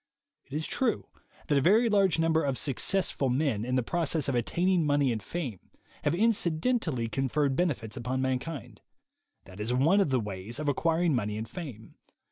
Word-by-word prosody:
It 135 - -13
is 155 +1 -1
true 250 -4 -1 0.4
that 145 -2 +2
a - - 0
very 215 - +4
large 195 -6 +3
number 165 0 +2
of 135 -2 -1
Successful 145 0 0
Men, 125 -5 0
in 125 +2 -1
the 130 - +2
process 160 +1 0
of 135 - 0
attaining 175 +9 +1
money 145 -3 +2
and 110 -2 -2
fame, 130 - -5 0.4
have - - +1
inci 180 -5 +2
dentally 160 - 0
conferred 135 +2 0
benefits 130 -11 -1
upon 125 +2 -2
mankind. 130 +3 -3 0.6
That 95 +1 -13
is 115 +4 -1
one 165 +10 +4
of 190 - +1
the 130 -1 +2
ways 105 +1 -5
of 150 0 -4
acquiring 165 +3 +2
money 105 -4 -1
and 110 +1 -4
fame. 135 - -9
145 Hz, 180 wpm, -29 LUFS, 125-170 Hz, 0.6 s, very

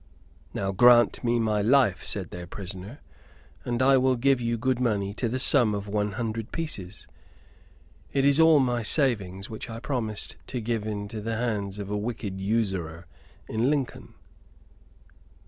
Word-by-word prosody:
"Now 95 -1 -1
grant 120 +4 +5
me 120 0 +1
my 110 -2 +1
life," 115 - +3
said - - -4
their 90 0 -7
prisoner, 95 - -7 0.6
"and 120 +1 -1
I 135 0 +5
will 130 0 +3
give 130 +1 +2
you 115 0 -1
good 130 +2 0
money 100 -5 0
to 115 +2 -2
the 125 - -2
sum 125 -5 +4
of 100 0 -5
one 105 0 -1
hundred 115 +1 -4
pieces. 105 - -5 1.0
It 135 -1 +1
is 140 +2 +4
all 160 -2 +6
my 125 -3 +1
savings, 105 - 0
which 110 +1 -8
I 115 0 -6
promised 115 -5 -3
to 125 - -4
give 110 -1 -2
into 105 +1 -5
the 115 +2 -3
hands 105 -4 -2
of 100 -1 -6
a 105 - -1
wicked 105 -3 -4
usurer 95 -6 -2 0.4
in 115 +4 0
Lincoln." 145 -4 -3
115 Hz, 160 wpm, -26 LUFS, 100-125 Hz, 1.0 s, all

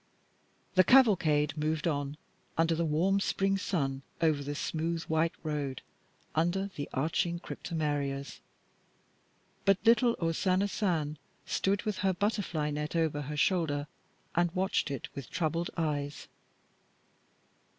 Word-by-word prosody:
The 185 - +6
cavalcade 170 - +5
moved 155 +1 -1
on, 145 -2 -1 0.4
under 165 0 +3
the 165 0 0
warm 180 +6 +2
spring 195 0 +1
sun, 135 -9 -1 0.2
over 155 -3 +2
the 145 +1 -4
smooth 165 +2 -2
white 160 +1 +1
road, 145 -4 -3 0.5
under 180 +5 +1
the 145 - -4
arching 165 +4 0
cryptomerias; 145 -6 -3 1.2
but 195 -1 +4
little 235 +1 +5
O 165 -1 +1
Sana 185 +3 +2
Sun 160 -8 -1 0.3
stood 195 +1 0
with 210 -3 -2
her 190 -1 +2
butterfly 180 -7 0
net 150 +2 -3
over 160 -3 +1
her 150 +1 -5
shoulder 145 -4 +1 0.5
and 175 0 +3
watched 190 -4 +1
it 140 -3 -4
with 140 -2 -7
troubled 170 +1 -1
eyes. 145 -3 -2
160 Hz, 125 wpm, -31 LUFS, 150-185 Hz, 1.2 s, The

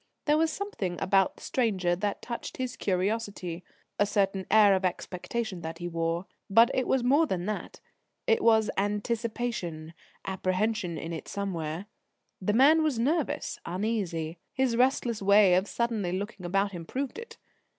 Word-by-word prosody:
There 300 0 +3
was 325 0 +2
something 215 - -4
about 195 -1 +2
the - - -15
stranger 190 -8 +1
that 200 +2 -3
touched 235 -1 -6
his 255 -1 -3
curiosity 190 -2 -2 0.4
a 205 - +4
certain 195 -2 0
air 210 -2 +7
of 190 0 +1
expectation 185 +2 -3
that 160 0 -5
he 175 - -5
wore. 165 +1 -1 0.2
But 230 +4 +6
it 255 - 0
was 265 -2 +2
more 285 +6 +4
than 180 -6 -2
that: 210 +1 -5 0.4
it 455 -3 +2
was 220 -2 +4
anticipation, 210 -5 -2 0.3
apprehension 190 -1 -1
in 165 +2 -5
it 160 - -6
somewhere. 175 -3 -3 0.6
The 205 +2 +1
man 290 +7 +6
was 305 -6 +1
nervous, 290 +6 -1
uneasy. 175 -4 -2
His 260 -3 +1
restless 245 -3 +2
way 200 -1 +6
of 185 +3 +3
suddenly 225 -6 -1
looking 195 -1 -4
about 195 +2 +1
him 175 -3 -6
proved 270 - -4
it. 465 0 -10
205 Hz, 155 wpm, -28 LUFS, 180-235 Hz, 0.6 s, air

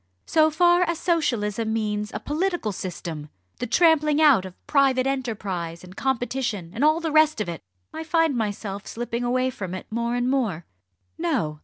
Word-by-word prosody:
so 315 -1 +4
far 350 +3 +4
as 340 -2 +1
Socialism 230 - 0
means 210 -1 -1
a - - -4
political 340 - -1
system 170 -5 -6 0.3
the 250 - -2
trampling 305 0 +4
out 280 -11 +5
of 185 -1 -12
private 270 -3 +3
enterprise 200 -11 -3
and 185 +1 -12
competition, 245 -8 -2
and 235 - -2
all 310 +2 +4
the 330 -2 -2
rest 310 -3 +4
of 210 - -1
it 170 -2 -5 0.3
I 320 - -5
find 320 -2 +2
myself 205 -2 -3
slipping 240 +1 -4
away 255 +1 +1
from 190 -6 -5
it 185 - -7
more 235 +1 -1
and 245 0 0
more. 225 -11 0 0.5
No! 235 - -1
245 Hz, 170 wpm, -24 LUFS, 205-305 Hz, 0.5 s, out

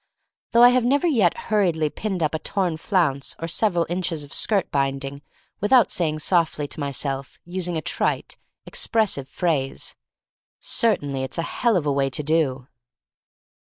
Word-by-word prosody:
Though 235 +1 +7
'I 245 - +10
have 250 0 +2
never 280 +7 +2
yet 225 - +3
hurriedly 170 -8 +2
pinned 195 -5 -3
up 155 - 0
a 160 - -1
torn 180 -3 -1
flounce 155 -7 0
or 165 - -4
several 175 -1 +1
inches 170 -3 -2
of 145 - -8
skirt 200 -4 +1
binding 135 0 -2 0.4
without 215 0 +4
saying 155 -4 0
softly 165 -5 +1
to - - -7
myself, 140 -1 -2
using 175 -1 -2
a 155 - -4
trite, - - -2 0.3
expres 220 -3 0
sive 140 -1 -6
phrase, 145 -7 -1 0.7
"Certainly, 145 - +1
it's 130 - -4
a 165 - 0
hell 230 +3 +1
of 160 - -2
a 145 - +1
way 135 -1 +1
to 140 +3 -2
do." 140 -4 0
165 Hz, 160 wpm, -23 LUFS, 140-195 Hz, 0.7 s, I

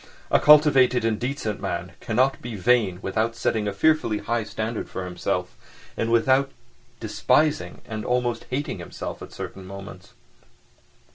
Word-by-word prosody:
A - - +5
cultivated 135 -5 +6
and 110 -2 0
decent 125 -5 -3
man 85 +1 -3
cannot 130 +4 +1
be 120 -2 -6
vain 105 -2 +2
without 110 +4 -1
setting 110 -2 0
a - - 0
fearfully 115 0 +2
high 115 +2 -1
standard 110 +1 -4
for 95 - -5
himself, 90 -1 -3 0.4
and 115 0 -1
without 130 +4 +3 0.5
despising 155 0 +1
and 110 -2 -5
almost 125 -1 -1
hating 130 -6 -3
himself 85 - -7
at - - -9
certain 95 - -7
moments. 100 +1 -10
115 Hz, 140 wpm, -24 LUFS, 105-130 Hz, 0.5 s, cultivated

